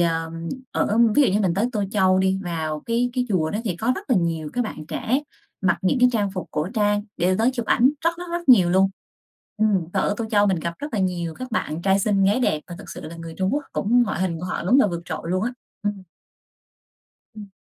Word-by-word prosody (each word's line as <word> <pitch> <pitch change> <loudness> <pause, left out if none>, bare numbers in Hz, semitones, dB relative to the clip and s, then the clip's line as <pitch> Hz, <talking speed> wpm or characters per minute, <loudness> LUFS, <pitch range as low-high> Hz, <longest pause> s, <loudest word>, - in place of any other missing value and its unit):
ờ, 165 -1 0 0.4
ở 215 +3 +1 0.2
ví 295 - +6
dụ 270 - +4
như 205 - +2
mình 180 -4 +1
tới 205 +4 +1
Tô 210 -4 0
Châu 190 -2 +3
đi, 190 0 +2
vào 160 -3 -3
cái 235 +2 +1
cái 250 -1 -1
chùa 160 -6 +1
đó 205 - -2
thì 180 -6 -2
có 230 +7 +1
rất - - -8
là 245 - +5
nhiều 165 -4 -1
các 245 - 0
bạn 155 -7 -7
trẻ 260 +6 -1 0.4
mặc 185 -3 +2
những 190 +8 +2
cái 250 - +7
trang 205 -3 0
phục 185 -1 -6
cổ 150 +4 -2
trang 205 -1 +1
để 185 +2 +2
tới 230 +3 +3
chụp 240 -3 -4
ảnh, 255 +4 +4
rất 335 - +5
rất 355 - -5
rất 345 -4 -4
nhiều 185 -9 +7
luôn. 190 +1 +4 0.7
Ừm, 210 -5 +2
và 195 - +1
ở 205 - +1
Tô 230 - -2
Châu 205 -2 +4
mình 190 -3 +1
gặp 170 +1 -3
rất 290 -4 -6
là 210 - 0
nhiều 175 -3 -1
các 255 0 -7
bạn 170 -7 -2
trai 195 +1 +3
xinh 195 -1 +2
gái 205 +6 +3
đẹp, 155 -10 +1
và 175 - -8
thực - - -10
sự - - -7
là 165 +2 -8
người 165 -1 -8
Trung 190 0 0
Quốc 295 - -2
cũng 240 +4 +3
ngoại 210 -7 -2
hình 175 -3 -1
của - - -5
họ 180 - -3
đúng 250 +10 +5
là - - +4
vượt 170 -3 -4
trội - - -5
luôn 185 +2 0
á. 245 - -2 0.3
Ừm. 205 -2 -2 1.3
Ừm. 210 -2 -9
195 Hz, 255 wpm, -23 LUFS, 175-225 Hz, 1.3 s, cái